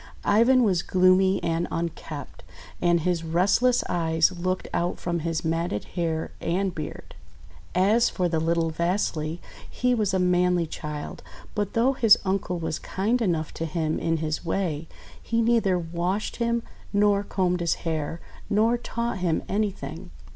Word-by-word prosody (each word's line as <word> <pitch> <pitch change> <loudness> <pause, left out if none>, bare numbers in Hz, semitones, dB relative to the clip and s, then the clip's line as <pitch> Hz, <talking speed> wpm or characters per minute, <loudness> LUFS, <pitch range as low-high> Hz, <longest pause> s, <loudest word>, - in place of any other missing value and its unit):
Ivan 240 +5 +5
was 185 -6 +2
gloomy 185 +1 +3
and 165 +1 0
unkempt, 160 -4 -5 0.4
and 175 -1 +3
his 175 0 0
rest 175 +7 +2
less 250 -1 +3
eyes 165 -1 +2
looked 185 +1 -2
out 175 +1 0
from 170 -1 -2
his 165 0 -2
matted 165 -8 -1
hair 165 -2 -2
and 185 +2 0
beard. 155 - -7 0.6
As 210 +6 +4
for 180 -2 0
the 165 -2 0
little 165 0 +1
Vasily, 170 -2 -1 0.3
he 250 0 +1
was 215 -5 +1
a 190 - +1
manly 180 -1 +2
child; 150 -1 -6 0.3
but 205 -2 -2
though 245 +4 +3
his 225 -5 +6
uncle 190 -2 -1
was 160 -2 -3
kind 225 +6 -1
enough 165 -7 0
to 165 - -3
him 160 -1 -1
in 165 0 0
his 155 -1 -2
way, 165 -3 -2 0.3
he 230 - -1
neither 225 -5 +3
washed 175 +4 -2
him, 235 -1 0 0.3
nor 205 -1 +3
combed 180 -3 0
his 170 -1 +1
hair, 160 0 -2 0.3
nor 225 +3 +3
taught 235 -3 -3
him 175 -3 0
anything. 185 -5 -3
180 Hz, 155 wpm, -25 LUFS, 165-205 Hz, 0.6 s, his